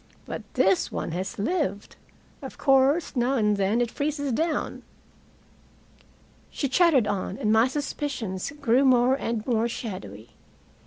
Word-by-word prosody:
But - - -5
this 195 -8 +2
one - - -4
has 185 +3 -4
lived. 205 - -2 0.5
Of - - -9
course 275 +4 +3
now 250 +2 +1
and 210 -4 +2
then 200 +4 +1
it 240 -1 -1
freezes 285 -1 -2
down." 315 +5 -1 1.7
She 280 - -2
chattered 280 - +4
on, 200 -1 -3
and 210 0 +1
my 225 +2 +5
suspicions 265 -8 -4
grew 260 -1 +3
more 255 -1 +4
and 230 -5 -2
more 235 -2 +1
shadowy. 120 - -7
240 Hz, 135 wpm, -25 LUFS, 205-275 Hz, 1.7 s, my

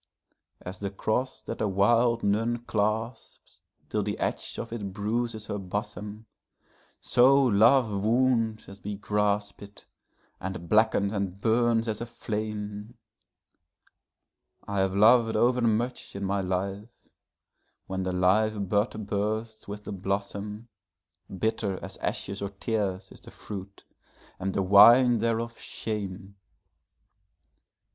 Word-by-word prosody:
As 95 +1 -8
the 100 - -3
cross 115 +6 -2
that - - -6
a 110 - +2
wild 115 +4 +3
nun 115 +4 0
clasps 110 +2 -3 0.3
till - - -1
the - - -3
edge - - -3
of 115 - -5
it 100 -4 -4
bruises 110 +2 -2
her 105 - -4
bosom, 105 +2 -5 0.7
So 130 +3 +5
love 115 -3 +4
wounds 115 -1 +1
as 100 0 -13
we 105 0 -4
grasp 105 0 -1
it, 100 0 -13 0.5
and 90 -2 -6
blackens 105 -1 +3
and 100 -2 -3
burns 115 +1 +2
as 110 0 -3
a 120 - -4
flame;I 105 -2 -9
have 95 0 +1
lov'd 115 +2 +5
overmuch 120 -1 +1
in 100 - -4
my 100 +1 0
life: 95 +3 -3 1.0
when 95 0 -3
the 95 0 -2
live 100 +2 +2
bud 105 +1 0
bursts 110 +2 -3
with 105 +1 -7
the - - -7
blossom, 100 +3 -4 0.6
Bitter 100 0 -1
as - - -8
ashes 100 +1 -3
or 100 - -2
tears 100 -2 -3
is - - -13
the - - -12
fruit, 100 -1 -9 0.6
and 95 0 -3
the 95 - +1
wine 115 +5 +7
thereof 115 +1 -1
shame. 100 -2 -5
105 Hz, 120 wpm, -27 LUFS, 100-115 Hz, 1.0 s, wine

